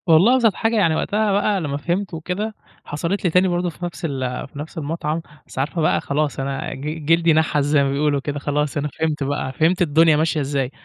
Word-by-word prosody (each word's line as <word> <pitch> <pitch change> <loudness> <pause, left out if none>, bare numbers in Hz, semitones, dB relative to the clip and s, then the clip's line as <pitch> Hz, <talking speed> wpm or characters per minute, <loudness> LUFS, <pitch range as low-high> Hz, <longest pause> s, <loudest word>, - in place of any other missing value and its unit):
والله 175 +10 +6
أبسط 230 -5 +3
حاجة 225 +1 0
يعني 170 -7 +3
وقتها 210 +4 0
بقى 205 +1 +2
على 175 -6 -2
ما 140 0 -2
فهمت 175 +6 -2
وكده، 185 +7 -3 0.3
حصلِت 170 +7 -2
لي 180 - +3
تاني 180 +3 +3
برضه 175 0 0
في 175 +2 -7
نفس 175 0 -6
ال 130 -4 -3
في 145 - -11
نفس 155 +4 -8
المطعم، 155 +1 -2 0.3
بس - - -8
عارفة 150 +5 -1
بقى 155 - +2
خلاص 145 0 -1
أنا 135 0 -3
ج 150 +3 -5
جلدي 165 +1 +4
نحس 155 -2 +2
زي 145 0 +3
ما 135 - 0
بيقولوا 145 0 +1
كده 145 +1 -4
خلاص 145 +1 -1
أنا 145 +1 -1
فهمت 155 -2 0
بقى، 140 -1 -2
فهمت 165 +6 +2
الدنيا 160 -1 +4
ماشية 160 0 +1
إزاي، 135 -2 -1
155 Hz, 220 wpm, -21 LUFS, 145-175 Hz, 0.3 s, والله